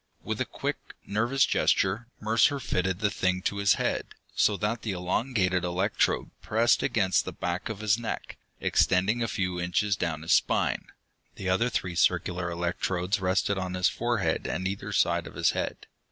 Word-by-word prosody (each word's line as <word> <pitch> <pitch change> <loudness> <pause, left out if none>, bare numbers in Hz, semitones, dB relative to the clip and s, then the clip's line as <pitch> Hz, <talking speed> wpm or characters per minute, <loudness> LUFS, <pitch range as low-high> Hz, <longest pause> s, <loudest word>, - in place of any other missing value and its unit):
With - - -3
a - - +1
quick, - - -3 0.3
nervous 115 +6 +2
gesture, 100 +5 +1
Mercer 115 +6 +3
fitted 95 -5 -1
the 100 -1 +2
thing 95 0 0
to 100 - -1
his 100 -1 +4
head, - - -2 0.2
so 105 - +3
that 105 +5 -1
the 105 - -2
elongated 90 0 0
electrode 90 +4 0
pressed 115 +2 +2
against 95 -6 +2
the - - -5
back 90 +4 -3
of 110 -2 -5
his 110 +1 +2
neck, 115 - -5 0.2
extending 95 +6 +2
a 115 - +1
few 90 -2 -2
inches 95 +3 +1
down 80 -4 -3
his 85 - +2
spine. - - +2 0.5
The 95 - -4
other 115 +7 +2
three 90 -5 -2
circular 85 +1 +1
electrodes 90 +3 -1
rested 95 +1 +1
on 95 0 -3
his 90 0 +3
forehead 120 -4 -1
and 95 +1 -2
either 95 +1 -4
side - - +1
of - - -11
his - - +3
head. - - -4
95 Hz, 170 wpm, -28 LUFS, 90-110 Hz, 0.5 s, his